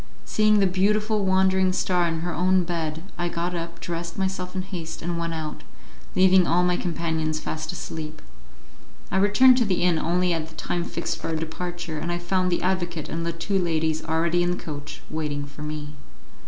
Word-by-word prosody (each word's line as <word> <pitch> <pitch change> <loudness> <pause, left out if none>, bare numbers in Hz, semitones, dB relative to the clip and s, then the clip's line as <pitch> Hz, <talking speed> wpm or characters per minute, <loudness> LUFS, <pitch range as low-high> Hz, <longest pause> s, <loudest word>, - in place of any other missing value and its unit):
Seeing 215 0 +4
the 195 - +5
beautiful 210 +3 +2
wandering 190 0 +3
star 180 -2 +2
in 165 -1 -2
her 175 0 -2
own 185 +2 +3
bed, 165 -2 -3 0.2
I 175 0 0
got 170 +1 -2
up, 170 0 -5
dressed 170 0 -4
myself 190 -1 -2
in 185 - -1
haste, 170 -5 -6
and 175 +1 -1
went 170 -1 -2
out, 155 -1 -5 0.5
leaving 185 -1 +6
all 175 +2 +3
my 180 0 +3
companions 160 -3 -1
fast 160 0 -4
asleep. 155 -1 -6 0.9
I - - +1
returned 230 +6 +6
to 240 - +3
the 185 -4 +1
inn 175 -3 +3
only 180 +2 +2
at 160 -1 -2
the - - -16
time 175 -1 -2
fixed 170 - -3
for - - -3
our 165 - -1
departure, 165 0 -4
and 170 +3 -2
I 175 - 0
found 180 +1 0
the 175 - 0
advocate 175 -4 -1
and 165 +1 -2
the - - +1
two 170 +4 -1
ladies 160 -3 0
already 165 +2 +1
in 175 - +2
the 180 - 0
coach, 150 -1 -7
waiting 150 -2 -2
for 145 +1 -11
me. 150 0 -5
175 Hz, 195 wpm, -25 LUFS, 160-185 Hz, 0.9 s, leaving